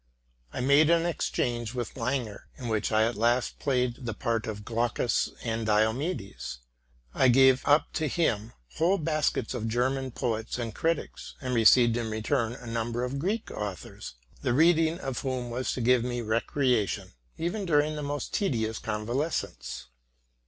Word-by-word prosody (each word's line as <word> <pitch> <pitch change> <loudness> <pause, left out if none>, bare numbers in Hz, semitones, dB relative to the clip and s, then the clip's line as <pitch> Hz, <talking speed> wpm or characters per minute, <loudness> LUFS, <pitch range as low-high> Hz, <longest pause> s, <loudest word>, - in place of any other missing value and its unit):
JI - - -4
made 140 +4 +5
an 170 0 +4
exchange 120 -8 -1
with 120 -2 -3
Langer, 120 -4 -3
in 125 -4 -5
which 110 0 0
I 110 0 +4
at 115 +2 +1
last 120 +3 +1
played 125 -2 0
the 110 - -3
part 115 -1 -1
of 105 -1 -5
Glaucus 120 0 0
and 115 -1 -2
Diomedes: 110 - -1 0.6
I 130 - +4
gave 130 +1 +6
up 145 +2 +3
to 155 - 0
him 120 -9 0 0.2
whole 180 +5 +3
baskets 155 -5 0
of 115 -3 -3
German 130 +3 0
poets 115 -3 -2
and 115 -3 -4
critics, 165 +7 -2
and 130 -2 -3
received 120 0 +6
in 115 -2 -2
return 115 +2 0
a 125 - -11
number 115 +1 -2
of 130 +2 -3
Greek 205 +8 -2
authors, 100 -10 -6 0.3
the 120 - +1
reading 165 +2 +4
of 135 -8 -4
whom 130 -3 -3
was 125 +2 -2
to 125 - -3
give 125 0 +4
me 120 -1 -2
recre 120 +4 +1
ation, 100 -3 -3 0.3
even 175 +6 -2
during 150 -1 +2
the 150 - -4
most 145 -1 -4
tedious 110 - 0
convalescence. 110 - -3
125 Hz, 160 wpm, -28 LUFS, 115-145 Hz, 0.6 s, gave